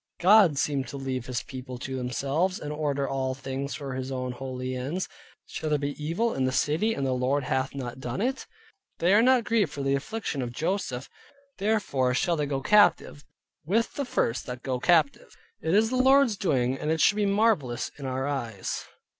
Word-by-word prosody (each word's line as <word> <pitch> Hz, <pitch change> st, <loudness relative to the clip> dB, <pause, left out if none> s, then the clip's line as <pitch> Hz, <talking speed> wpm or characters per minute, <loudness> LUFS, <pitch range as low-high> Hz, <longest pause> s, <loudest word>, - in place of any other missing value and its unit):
God 185 Hz, -5 st, +6 dB
seemed 140 Hz, -1 st, 0 dB
to 140 Hz, -, -7 dB
leave 130 Hz, -2 st, -4 dB
his 125 Hz, -2 st, -3 dB
People 130 Hz, -1 st, -8 dB
to 130 Hz, +2 st, -5 dB
themselves, 140 Hz, +8 st, -1 dB
and 150 Hz, -, -5 dB
order 145 Hz, -2 st, -1 dB
all 130 Hz, -1 st, -2 dB
things 135 Hz, +1 st, -4 dB
for 140 Hz, -3 st, -5 dB
His 130 Hz, +1 st, -4 dB
own 125 Hz, -1 st, -3 dB
holy 130 Hz, 0 st, -5 dB
ends. 145 Hz, +9 st, -3 dB, 0.4 s
Shall 155 Hz, -, -4 dB
there 150 Hz, -, +2 dB
be 145 Hz, 0 st, -2 dB
evil 185 Hz, +10 st, 0 dB
in 130 Hz, -, 0 dB
the 130 Hz, -, +1 dB
City 160 Hz, +12 st, +1 dB
and 140 Hz, -, -2 dB
the 130 Hz, -, 0 dB
Lord 130 Hz, +3 st, 0 dB
hath 130 Hz, +1 st, -1 dB
not 130 Hz, -2 st, -5 dB
done 125 Hz, +2 st, -4 dB
it? 260 Hz, +5 st, -1 dB, 0.5 s
They 175 Hz, +3 st, +3 dB
are 210 Hz, -, +6 dB
not 255 Hz, 0 st, +4 dB
grieved 215 Hz, -8 st, +1 dB
for 140 Hz, -, -5 dB
the 135 Hz, 0 st, +1 dB
affliction 145 Hz, 0 st, -3 dB
of 120 Hz, -1 st, -3 dB
Joseph, 155 Hz, -4 st, -2 dB, 0.5 s
therefore 190 Hz, -12 st, +1 dB
shall 175 Hz, +3 st, +1 dB
they 150 Hz, -2 st, -1 dB
go 135 Hz, -1 st, -2 dB
captive, 205 Hz, -5 st, +3 dB, 0.4 s
with 220 Hz, +9 st, 0 dB
the 280 Hz, -, -3 dB
first 120 Hz, -, -1 dB
that 125 Hz, -1 st, -6 dB
go 130 Hz, -2 st, -2 dB
captive. 160 Hz, -2 st, +2 dB, 0.3 s
It 160 Hz, +4 st, +1 dB
is 220 Hz, +2 st, +3 dB
the 255 Hz, -, 0 dB
Lord's 265 Hz, -2 st, +5 dB
doing, 135 Hz, -9 st, 0 dB
and 150 Hz, -, -2 dB
it 160 Hz, 0 st, +1 dB
should 205 Hz, -, +5 dB
be 205 Hz, -1 st, +2 dB
marvelous 200 Hz, -, +1 dB
in 135 Hz, -, -5 dB
our 130 Hz, +1 st, -2 dB
eyes. 120 Hz, -9 st, -3 dB
140 Hz, 200 wpm, -27 LUFS, 130-190 Hz, 0.5 s, God